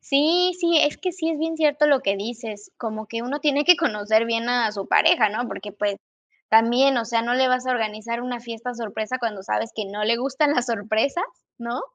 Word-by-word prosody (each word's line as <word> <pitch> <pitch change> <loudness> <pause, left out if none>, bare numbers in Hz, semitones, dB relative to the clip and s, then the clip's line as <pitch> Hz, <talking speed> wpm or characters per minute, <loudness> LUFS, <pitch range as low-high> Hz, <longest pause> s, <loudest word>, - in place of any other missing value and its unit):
Sí, 335 +6 +3
sí, 340 -2 +3
es 295 - +2
que 365 -2 -3
sí 325 -2 -3
es 315 - -3
bien 325 +1 -2
cierto 300 -1 +3
lo 280 -3 +4
que 200 -6 0
dices, 215 -1 -7
como 220 -2 -5
que 230 +2 -5
uno 280 +4 -4
tiene 290 0 +2
que 360 +2 +7
conocer 220 -7 +1
bien 230 +1 -1
a 245 -3 +2
su 200 -2 -6
pareja, 325 -10 +4
¿no? 220 +4 -3
porque, 205 0 -7
pues, 205 -1 -2 0.5
también, 240 +5 +4
o 235 - 0
sea, 230 +1 0
no 240 +1 0
le 260 0 +3
vas 255 0 0
a 255 - +1
organizar 230 +1 -3
una 245 -1 -4
fiesta 235 +1 -6
sorpresa 220 +2 -4
cuando 215 -5 -4
sabes 225 +3 -2
que 215 - -3
no 205 +2 -4
le 235 +2 +2
gustan 275 +4 +1
la 245 - +1
sorpresa, 225 +6 -1 0.4
¿no?, 235 +1 -4
235 Hz, 220 wpm, -23 LUFS, 220-280 Hz, 0.5 s, que